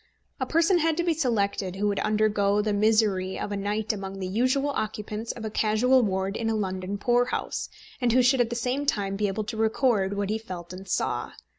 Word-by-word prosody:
A - - -1
person 335 +3 +3
had 325 -1 +1
to 345 - +1
be 340 -1 +2
selected 205 - 0
who 205 +2 0
would 200 - -1
undergo 210 -1 +2
the 210 0 0
misery 205 -3 +2
of - - -4
a - - -1
night 210 +2 -1
among 195 -1 -6
the 190 - -4
usual 255 +8 +1
occupants 215 -2 -3
of 225 - -7
a 215 - -4
casual 225 +5 +3
ward 195 -2 -1
in 225 0 -1
a 225 - 0
London 190 -1 -3
poor 240 +4 +2
house, - - -3 0.3
and 245 -1 +3
who 250 +2 +4
should 250 +1 +4
at 235 - +1
the 240 - -3
same 255 +4 -1
time 195 -5 0
be 205 +1 0
able 200 +2 -2
to 220 +2 -6
record 220 -3 +1
what 200 0 -1
he 220 - -1
felt 180 -5 -8
and 190 +1 -9
saw. - - -1
215 Hz, 225 wpm, -26 LUFS, 200-245 Hz, 0.3 s, who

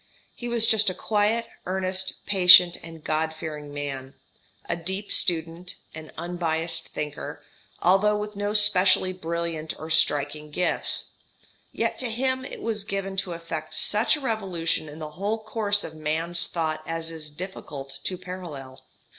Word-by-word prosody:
He 240 - -7
was 235 -1 +2
just 215 -2 +4
a 185 - -4
quiet, 215 +3 +1 0.2
earnest, 185 0 -1
patient, 180 -3 +8
and 165 -2 -11
God 160 +1 0
fearing 150 -2 -6
man, 140 -2 -5 0.5
a - - 0
deep 190 +4 -4
student, 170 +1 +1 0.2
an 155 0 -9
unbiassed 165 -1 -2
thinker, 150 -1 -5 0.4
although 200 +4 +4
with 210 0 -5
no 205 +1 -2
specially 185 -3 +5
brilliant 170 -2 -3
or 160 +1 -6
striking 150 -1 +1
gifts; 180 +4 +1 0.6
yet - - -1
to 255 - 0
him 260 +3 0
it - - -8
was 215 -3 -1
given 195 -1 -3
to 190 -2 -1
effect 165 -2 -5
such 215 +7 +4
a - - -6
revolution 185 - -1
in 150 - -10
the 155 -1 -6
whole 200 +7 -1
course 215 -2 -1
of 160 - -7
man's 160 +2 -1
thoughts 160 -2 -2
as 165 0 -2
is 155 -2 -4
difficult 150 -4 -7
to 185 - -2
parallel. 170 -8 -8
175 Hz, 150 wpm, -26 LUFS, 160-200 Hz, 0.6 s, patient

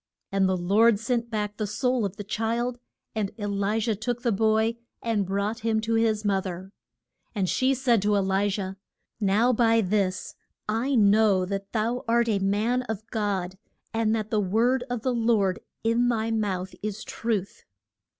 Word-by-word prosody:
And 195 -1 +2
the 185 - +1
Lord 205 +5 +4
sent 235 0 -1
back 210 -2 -3
the 215 - -2
soul 250 +1 0
of 195 -1 -4
the 205 - -6
child, 235 +4 -2 0.3
and 215 -3 -1
E 205 - -4
li 200 +1 0
jah 225 0 0
took 240 +3 -3
the 235 - +2
boy 220 +2 +2 0.3
and 215 -5 0
brought 200 +3 -1
him 220 -1 +1
to 225 +1 -1
his 220 -2 +1
moth 195 -1 +1
er. 185 +2 -7 0.6
And 195 -3 0
she 260 +7 +2
said 245 -4 +2
to 205 +1 +2
E - - +3
li 195 +1 +1
jah, 195 -1 -3 0.5
Now 215 +4 +3
by 230 -1 +4
this 190 -2 -1 0.3
I 230 +6 0
know 205 -3 +4
that 195 +1 -4
thou 230 +2 -1
art 235 +1 +3
a 205 -3 +2
man 210 +6 +1
of 220 -1 -4
God, 190 -4 -2 0.3
and 225 -1 +1
that 215 -1 -3
the 215 -2 +2
word 235 +7 +2
of 245 -3 -3
the 255 - +1
Lord 225 -5 +2 0.2
in 230 +2 +2
thy 225 -1 0
mouth 190 -4 -2
is 210 0 -4
truth. 215 -4 -3
215 Hz, 180 wpm, -26 LUFS, 200-230 Hz, 0.6 s, Lord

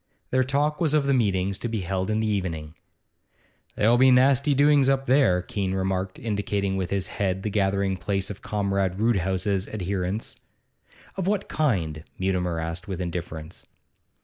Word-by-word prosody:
Their 130 0 +3
talk 145 +4 0
was 155 -3 +2
of 150 -2 +2
the 140 - +2
meetings 100 -5 +1
to 120 - -3
be 110 -3 -2
held 95 +2 -2
in 110 0 +1
the 110 - 0
evening. 85 -7 -2 1.0
'There'll 115 +3 +3
be 130 0 +7
nasty 135 +2 +4
doings 140 -1 +4
up 135 0 +1
there,' 125 -10 +3
Keene 95 0 -2
remarked, 95 0 -2
indicating 100 -3 -1
with 95 -2 -2
his 100 -2 -1
head 95 -1 -2
the 105 - -2
gathering 100 -1 +1
place 95 +1 -2
of 100 - -9
Comrade 100 -2 -1
Roodhouse's 95 -2 +1
adherents. 95 +1 -3 0.8
'Of 190 -1 -2
what 200 -1 0
kind?' 85 - -1
Mutimer 90 -3 -1
asked 85 +2 -5
with 95 -3 -4
indifference. 85 -2 -6
100 Hz, 160 wpm, -25 LUFS, 95-120 Hz, 1.0 s, be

